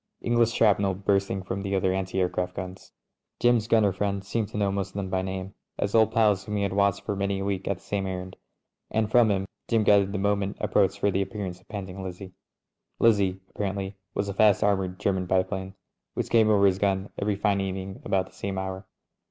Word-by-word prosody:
English 120 -1 +2
shrapnel 100 -4 +3
burst 100 0 +1
ing 95 -1 -3
from 95 +1 -4 0.2
other 95 -1 +2
anti 95 0 -2
aircraft 90 0 -1
gims. 90 +1 -7 0.5
Jim's 120 -2 +3
gunner 110 -4 +4
friend 100 0 -2
seemed 105 +1 -1
to 105 - -7
know 100 -1 +1
most 100 -1 -1
of - - -22
them 95 -2 -3
by 95 - +1
name, 95 +1 -5 0.2
as 100 - -1
old 110 -1 +5
pals 105 -4 +3
whom 105 0 -4
he 100 - 0
had 100 -1 -1
watched 100 -1 +2
for 100 - -2
many 100 0 -1
a 95 - -3
week 95 -1 -2
on 100 - +1
the - - -17
same 100 -2 -3
errand; 95 0 -5 0.5
and 110 -1 0
from 120 -2 +5
him 95 -1 0 0.2
Jim 115 -2 +2
gathered 100 -2 +5
that 100 - -7
the - - -1
moment 100 0 0
approached 95 -2 +2
for 100 - +1
the 95 - +1
appearance 95 -3 -5
of - - -29
Panting 95 -2 -6
Lizzie. 95 0 -7 0.6
Liz 115 -2 +5
zie, 95 -1 -1
apparently, 100 -1 -3 0.2
was 100 - -1
a 100 - -3
fast 105 0 +4
armoured 95 -2 0
German 95 -3 0
biplane 95 +1 -1 0.4
which - - -3
came 110 -2 +5
over 100 -2 +5
his 95 -1 +3
gun 100 0 0
every 105 0 +1
fine 100 -1 +1
evening 95 0 -5
about 95 -1 +1
the - - -18
same 100 -1 -4
hour. 95 0 -4
100 Hz, 220 wpm, -26 LUFS, 95-105 Hz, 0.6 s, old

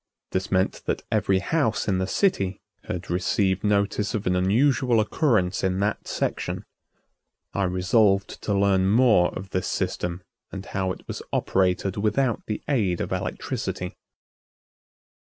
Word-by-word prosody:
This 95 +2 -2
meant 95 0 +1
that - - -1
every 95 - +2
house 115 +4 0
in 95 -3 +1
the 95 - -1
city 100 - +1 0.3
had 90 -1 -5
received 95 +1 +1
notice 105 0 +1
of 105 - -3
an 90 - +2
unusual 120 +6 +3
occurrence 110 - +1
in 95 0 +1
that 105 +1 -1
section. - - -2 0.9
I 100 - +1
resolved 95 +2 +2
to 100 -2 0
learn 95 -1 +3
more 110 -5 +5
of 95 +1 -7
this 90 - -1
system 90 +1 -2 0.3
and 95 0 -6
how 95 -1 -2
it - - -9
was - - -5
operated 95 0 +1
without 110 +4 +1
the 105 - -3
aid 105 - +1
of - - -3
electricity. - - -3
100 Hz, 140 wpm, -25 LUFS, 95-110 Hz, 0.9 s, more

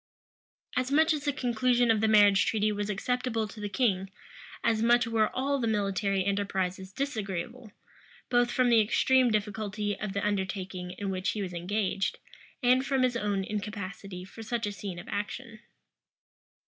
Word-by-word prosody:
As 255 +1 0
much 315 +3 +4
as 295 -1 -4
the 290 - +2
conclusion 245 -2 +2
of 220 -1 +2
the 220 - +3
marriage 205 -2 +5
treaty 215 -1 +1
was 205 0 -3
acceptable 225 +1 -1
to 210 +1 -11
the 205 0 -4
king, 195 -5 +1 0.5
as 225 -1 +2
much 240 +1 +4
were 225 -2 +2
all 275 +2 0
the 230 - 0
military 195 -2 0
enterprises 190 -2 -1
disagreeable, 220 -2 -4 0.6
both 245 -1 +3
from 250 0 +2
the 230 -2 +6
extreme 255 +4 +3
difficulty 210 -1 -1
of 205 -2 -4
the 200 0 -1
undertaking 190 -2 -3
in 200 -1 -3
which 185 0 -1
he 215 - -3
was 180 -2 -5
engaged, 195 +2 -1 0.5
and 250 +1 +4
from 270 -1 +1
his 250 -1 +2
own 205 -4 0
incapacity 200 -2 -5
for 225 - -11
such 230 +1 -2
a 205 - -2
scene 200 -3 -6
of 175 - -9
action. 215 +3 -5
210 Hz, 165 wpm, -29 LUFS, 195-240 Hz, 0.6 s, the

